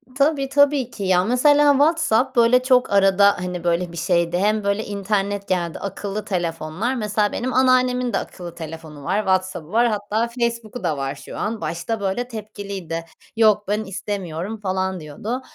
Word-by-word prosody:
Tabii, 280 -1 +1
tabii 280 -3 +3
ki. 200 - -6
Ya, 185 -1 +3
mesela 290 +5 +5
WhatsApp 275 -4 +2
böyle 240 +2 +5
çok 255 -3 +3
arada, 200 +1 +5
hani, 180 -1 -4
böyle 170 0 0
bir 170 - -9
şeydi 170 0 +1
hem 210 +2 +1
böyle 200 +2 0
internet 200 0 -2
geldi. 175 -3 -1
Akıllı 200 +1 -5
telefonlar. 175 +5 -2
Mesela 210 -2 0
benim 255 +1 -3
anneannemin 255 -1 +3
de - - +2
akıllı 175 -2 -7
telefonu 160 -3 -9
var. 195 - 0
WhatsApp'ı 185 -4 -1
var. 235 +2 +4
Hatta 215 +1 -1
Facebook'u 235 -2 -3
da 155 -4 0
var 135 0 -3
şu - - -10
an. 220 +1 -3
Başta 205 +7 -3
böyle 200 +5 -2
tepkiliydi. 200 -7 -6 0.3
"Yok 215 -2 +4
ben 210 +2 0
istemiyorum." 195 0 -5
falan 190 -2 -2
diyordu. 205 - -5
205 Hz, 160 wpm, -22 LUFS, 180-240 Hz, 0.3 s, mesela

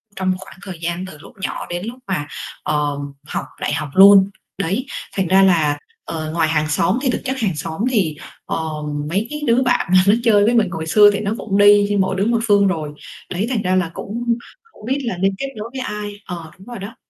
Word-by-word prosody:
trong 185 -1 0
khoảng 190 - -13
thời 185 -4 -8
gian 170 +2 -3
từ 155 -5 -10
lúc 160 - -14
nhỏ - - -3
đến 175 +3 -4
lúc 245 +3 -7
mà, 150 -7 -2 0.4
ờ, 150 -1 0 0.3
học - - -3 0.2
đại - - -1
học 150 -1 -3
luôn. 195 0 +8 0.3
Đấy, 195 +8 -1 0.3
thành 190 -3 0
ra 190 +2 +5
là, 160 -6 +3 0.3
ờ, 155 -1 -4
ngoài 165 -1 +2
hàng 155 -1 +1
xóm 165 +8 +2
thì 265 - 0
thực - - -3
chất 265 0 -1
hàng 200 -9 -1
xóm 160 +5 -5
thì, 180 -10 +1 0.3
ờ, - - -2 0.5
mấy 200 +6 -1
cái 300 0 -5
đứa 235 +2 +4
bạn 245 - +1
mà 185 0 +7
nó 205 - +7
chơi 210 -3 +5
với 235 - +3
mình 220 -5 +3
hồi 160 0 -4
xưa 205 +4 +7
thì - - -1
nó 205 0 -1
cũng 200 -3 -2
đi 205 0 +6
đi 205 - +1
mỗi 190 0 +1
đứa 195 +1 0
một 230 0 +2
phương 200 -2 +5
rồi, 155 -5 -2 0.4
đấy 190 +5 -2
thành 235 -5 0
ra 185 -1 +1
là 180 -3 0
cũng 235 +2 -2 0.4
hổng - - -14
biết 265 +4 0
là 210 -7 -2
nên 195 +1 +1
kết 275 - -3
nối 215 +2 -5
với 260 - -4
ai 210 -3 -4
ờ, 170 -3 -7
đúng 190 - -16
rồi 240 -4 -7
đó. 200 +4 -8
195 Hz, 240 wpm, -20 LUFS, 170-215 Hz, 0.5 s, luôn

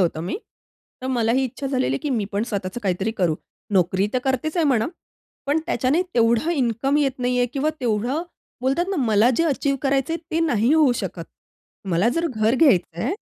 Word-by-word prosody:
होतं 165 -3 +1
मी. 175 - -3 0.7
तर - - -3
मलाही 235 +3 +2
इच्छा 270 +2 -5
झालेली 260 -1 0
आहे - - -1
की 295 - -2
मी 225 -5 0
पण 205 +2 0
स्वतःचं 200 +2 -3
काहीतरी 190 +2 0
करू. 165 -3 +2 0.4
नोकरी 190 +1 +2
तर 255 - +2
करतेच 270 +5 -1
आहे 330 - +3
म्हणा. 235 -5 +2 0.6
पण 295 +3 +2
त्याच्याने 265 +9 +1
तेवढा 235 +6 +3
इन्कम 270 0 0
येत 270 -3 +1
नाहीये 250 0 +1
किंवा 290 +3 0
तेवढं 245 +6 0 0.4
बोलतात 270 +7 +1
ना 390 - -1
मला 220 +2 +4
जे 335 - +2
अचीव्ह 275 -2 0
करायचंय 275 +3 +1
ते 325 +1 0
नाही 245 -5 +2
होऊ 300 -6 +5
शकत. 170 -3 -5 0.7
मला 175 +7 +3
जर 335 0 +1
घर 220 -4 +1
घ्यायचंय 220 - +2
250 Hz, 180 wpm, -22 LUFS, 215-280 Hz, 0.7 s, होऊ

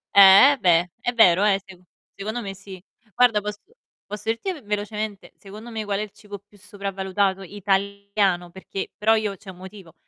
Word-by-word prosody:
Eh, 200 +7 +9
eh - - -5
beh, 175 -5 +3
è 245 - -2
vero, 195 -5 +5
eh, 200 -2 +3
seco 185 -2 -16 0.3
secondo 215 +4 -5
me 195 -3 -7
sì. 190 -1 -12 0.3
Guarda, 235 -4 +4
posso 210 0 -6 0.5
posso 210 0 -7
dirti 230 - -2
v 315 -8 -9
velocemente, 210 0 -4
secondo 210 +4 -11
me 220 -2 -5
qual 200 -1 -2
è - - -2
il 210 -1 -6
cibo 205 0 -11
più 205 +1 -24
sopravvalutato 195 -1 -2
italiano, 200 -1 -1
perché 190 +2 -7
però 220 +1 +3
io 215 -2 -2
c'è 195 - -14
un 180 - -16
motivo: 190 -2 -12
200 Hz, 185 wpm, -23 LUFS, 190-210 Hz, 0.5 s, Eh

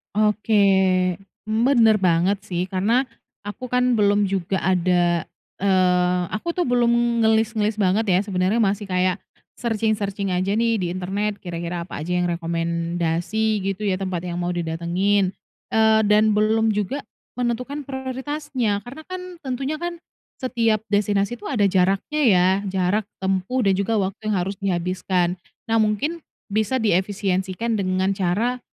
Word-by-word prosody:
Oke, 210 0 +2 0.8
bener 225 0 +4
banget 185 +2 +2
sih 175 -1 -1
karena 220 +8 +2 0.4
aku 205 +5 -6
kan 250 -2 +2
belum 205 0 +3
juga 190 -1 -1
ada, 175 -2 +2 0.3
eee, 180 -2 +2
aku 335 +11 -3
tuh 360 - +1
belum 235 -2 +2
ngelis-ngelis 220 -1 +2
banget 210 +2 +1
ya, 185 0 +4
sebenarnya 195 +3 +1
masih 200 0 -1
kayak 185 0 +1 0.4
searching-searching 210 -4 -1
aja 185 +3 0
nih 230 -1 +1
di 180 - -1
internet, 195 +4 -2
kira-kira 170 0 -4
apa 170 - -8
aja 180 +4 -2
yang 180 -1 +1
rekomendasi 170 +5 -1
gitu 195 +2 -3
ya, 195 -2 0
tempat 185 -3 -3
yang 175 -1 -4
mau 175 0 -2
didatengin, 175 +4 0 0.4
eee, 220 0 +5
dan 210 +1 +4
belum 220 +1 +2
juga 210 +7 -2 0.3
menentukan 250 +4 -2
prioritasnya, 265 -4 -3
karena 300 +5 -9
kan 370 +1 -6 0.2
tentunya 265 +3 -2
kan 345 +1 -5 0.4
setiap 230 -5 +1
destinasi 205 +2 +1
tuh 215 +2 -7
ada 210 -6 +3
jaraknya 195 +11 +1
ya, 185 -6 +5 0.2
jarak 190 +3 +1 0.2
tempuh 190 +5 0
dan 195 - +4
juga 205 +3 0
waktu 200 +3 -2
yang - - +1
harus 195 +3 -2
dihabiskan. 180 -1 0 0.3
Nah 225 - +1
mungkin 225 +10 0 0.2
bisa 215 +4 0
diefisiensikan 195 +1 0
dengan 185 0 0
cara, 210 +7 0
205 Hz, 140 wpm, -22 LUFS, 185-225 Hz, 0.8 s, eee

